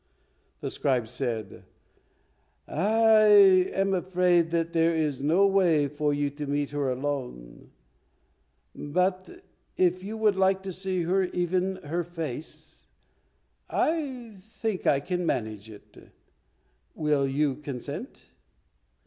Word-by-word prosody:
The - - -4
scribe 125 -5 0
said, 115 -4 -5 1.0
"I 220 +5 +3 0.5
am 195 0 0
afraid 180 -2 +2
that 165 0 -1
there 165 0 +2
is 150 -4 -1
no 165 +8 +3
way 175 -7 +3
for 150 +1 -1
you 145 0 -1
to 145 +1 -6
meet 145 0 -1
her 145 -2 -1
alone, 125 - -5 1.0
but 185 +5 -1 0.5
if 185 0 +1
you 215 +3 -6
would 215 -2 +2
like 190 0 +2
to 190 -1 -5
see 185 0 -2 0.3
even 180 +2 0
her 170 +4 -2
face, 160 -4 -7 0.8
I 265 -8 -2
think 220 0 -4
I 140 - +3
can 180 +4 -3
manage 110 - -3
it. 105 -2 -15 1.0
Will 150 -3 +1
you 140 0 0
consent?" 140 -4 -8
165 Hz, 115 wpm, -27 LUFS, 145-190 Hz, 1.0 s, I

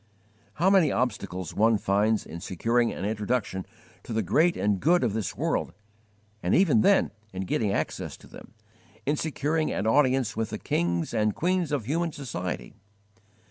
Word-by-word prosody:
How 185 +5 +3
many 185 -7 +5
obstacles 95 -8 -2
one 110 +1 +3
finds 105 +2 +1
in 85 - -8
securing 115 +6 +1
an 95 - -5
introduction 105 -2 -2 0.3
to - - -7
the 110 0 0
great 165 - +3
and 100 -2 +1
good 175 - +3
of 115 -5 +1
this 110 -3 -3
world, - - -1 0.7
and 90 - +1
even 155 - +4
then 200 - +4 0.2
in 95 0 -3
getting 100 +2 0
access - - -3
to - - -17
them, - - -14 0.5
in 145 - +1
securing 155 +1 -1
an 100 - -2
audience 130 -1 +2
with 110 -1 -2
the - - -4
kings 85 +2 -1
and 105 -2 +1
queens 175 -2 0
of 140 -7 -1
human 165 +6 0
society! 90 - -5
115 Hz, 165 wpm, -27 LUFS, 100-150 Hz, 0.7 s, many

